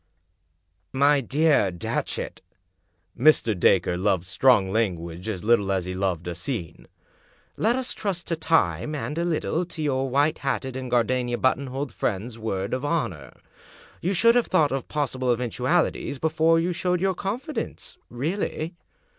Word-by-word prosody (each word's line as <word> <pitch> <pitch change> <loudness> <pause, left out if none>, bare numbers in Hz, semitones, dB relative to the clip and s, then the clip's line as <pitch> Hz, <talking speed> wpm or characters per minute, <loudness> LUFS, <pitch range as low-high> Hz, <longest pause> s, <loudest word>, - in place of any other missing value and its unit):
" 75 - -47 0.2
" 85 0 -47
My 145 -1 +5
dear 145 -4 +3
Datchet 85 -2 -4 0.3
" - - -47
— - - -28
Mr. 115 -7 +5
Dacre 90 0 +3
loved 95 -2 +1
strong 100 0 +3
language 90 -3 -2
as 95 -4 -4
little 105 -3 +3
as 95 -2 0
he 90 - -4
loved 90 -3 -2
a - - -2
scene^" 90 - -5 0.7
let 230 +3 +2
us 260 -1 -2
trust 190 -4 -3
to 165 - -1
time 160 -1 +1
and, 150 0 -4
a - - +1
little, 170 0 0
to 170 -2 -11
your 135 -2 0
white 145 +4 +2
hatted 130 -1 -2
and 130 -1 -5
gardenia 120 0 +1
buttonholed 130 0 -1
friend's 110 +5 -3
word 100 -2 -3
of 130 +2 -2
honor. 95 - -2 0.7
You 190 +3 0
should 230 +5 +5
have 245 -1 +2
thought 155 -6 +3
of 135 -1 -3
pos 145 -3 -2
sible 130 -1 0
eventualities 125 +5 0
before 160 +2 +3
you 175 +2 0
showed 180 +1 0
your 190 +1 +1
confidence 225 - -5
— - - -45
really. 160 +5 -3
130 Hz, 165 wpm, -25 LUFS, 100-160 Hz, 0.7 s, My